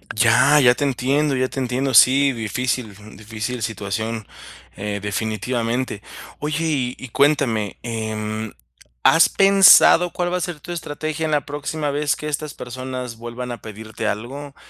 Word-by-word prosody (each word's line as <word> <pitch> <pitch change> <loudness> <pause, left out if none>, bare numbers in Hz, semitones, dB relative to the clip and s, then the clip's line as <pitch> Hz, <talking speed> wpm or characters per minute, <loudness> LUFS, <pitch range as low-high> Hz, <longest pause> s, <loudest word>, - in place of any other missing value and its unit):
Ya, 120 +6 +5
ya 125 -1 +6
te 145 - -2
entiendo, 140 +2 0
ya 130 0 0
te - - -5
entiendo. 130 +1 -1
Sí, 135 +4 +6
difícil, 120 -1 -3
mm, 105 -1 -14
difícil 110 +3 -5
situación, 110 +1 -4 0.5
eh, 100 +1 -4
definitivamente. 115 +3 -2 0.4
Oye, 150 +2 -2
y 130 -6 -1
y 130 - -9
cuéntame, 120 -7 +1
em, 110 -1 -4 0.5
¿has 165 - +6
pensado, 195 -3 +6
cuál 175 0 -2
va 180 - 0
a - - -4
ser 170 -2 -4
tu 175 - -8
estrategia, 155 -1 -4
en 155 - -2
la 145 -1 0
próxima 145 +1 -4
vez, 145 0 0
que 150 - -7
estas 150 0 -4
personas, 125 -1 -7
vuelvan 120 +1 -7
a 120 - -7
pedirte 110 0 -7
algo? 135 +7 -5
125 Hz, 155 wpm, -21 LUFS, 110-145 Hz, 0.5 s, ya